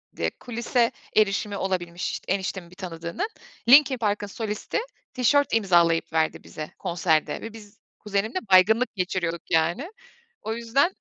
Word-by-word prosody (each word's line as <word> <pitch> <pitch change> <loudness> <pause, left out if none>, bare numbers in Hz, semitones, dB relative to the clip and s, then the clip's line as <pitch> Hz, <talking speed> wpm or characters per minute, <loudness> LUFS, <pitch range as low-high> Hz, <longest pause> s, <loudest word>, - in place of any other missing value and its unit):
D - - -19
eee, - - +3
kulise 235 0 0 0.2
erişimi 205 -1 +2
olabilmiş 180 -2 -3
eniştemin 190 -2 -2
bir 180 - -16
tanıdığının. 170 - -4 0.4
Linkin 275 0 +7
Park'ın 210 -2 -1
solisti 210 - -3 0.3
tişört 285 +3 +2
imzalayıp 175 -7 +3
verdi 160 -1 0
bize 155 0 -8
konserde 160 -2 0
ve 225 - -7
biz 210 -2 -13 0.2
kuzenimle 210 - -1
baygınlık 220 +7 +5
geçiriyorduk 180 -3 -3
yani. 170 - +1 0.5
O 220 - -3
yüzden 240 +10 +1
200 Hz, 130 wpm, -25 LUFS, 175-230 Hz, 0.5 s, Linkin